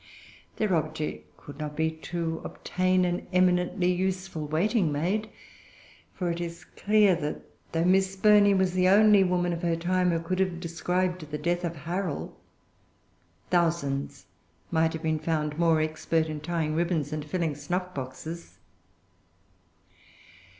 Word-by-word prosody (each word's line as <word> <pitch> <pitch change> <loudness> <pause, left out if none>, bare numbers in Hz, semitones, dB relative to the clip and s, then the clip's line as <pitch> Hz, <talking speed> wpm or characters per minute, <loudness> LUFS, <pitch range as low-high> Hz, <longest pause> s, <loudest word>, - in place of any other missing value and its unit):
Their 215 -4 0
object 155 -1 -4
could 145 0 -12
not 150 -1 -4
be 160 +1 +1
to 165 0 -4
obtain 185 0 0
an 175 0 -2
eminently 180 0 +2
useful 185 -3 -2
waiting 175 +3 +1
maid; 190 +9 -1 0.8
for 180 -2 -2
it 170 +1 -4
is 170 +1 -6
clear 210 -2 +3
that, 150 -2 -4 0.3
though 165 +1 +1
Miss 190 +1 +3
Burney 205 0 +5
was 190 -1 +2
the 185 0 +3
only 205 +1 +6
woman 180 -1 +1
of 170 - -4
her 170 -2 +1
time 180 +2 +1
who 165 -1 +1
could 185 +3 -3
have 185 -3 0
described 175 0 -2
the 150 - -3
death 175 +4 -1
of 170 -1 -2
Harrel, 165 - -4 1.2
thousands 160 - 0 0.5
might 160 -1 +2
have 160 +1 -6
been 160 -1 0
found 155 -1 -2
more 165 -2 +4
expert 160 +1 0
in 155 -1 -4
tying 155 0 -2
ribbons 160 -3 0
and 155 -1 -3
filling 165 0 -1
snuff 180 +6 -3
boxes. 140 +6 -7
170 Hz, 145 wpm, -27 LUFS, 160-185 Hz, 1.2 s, only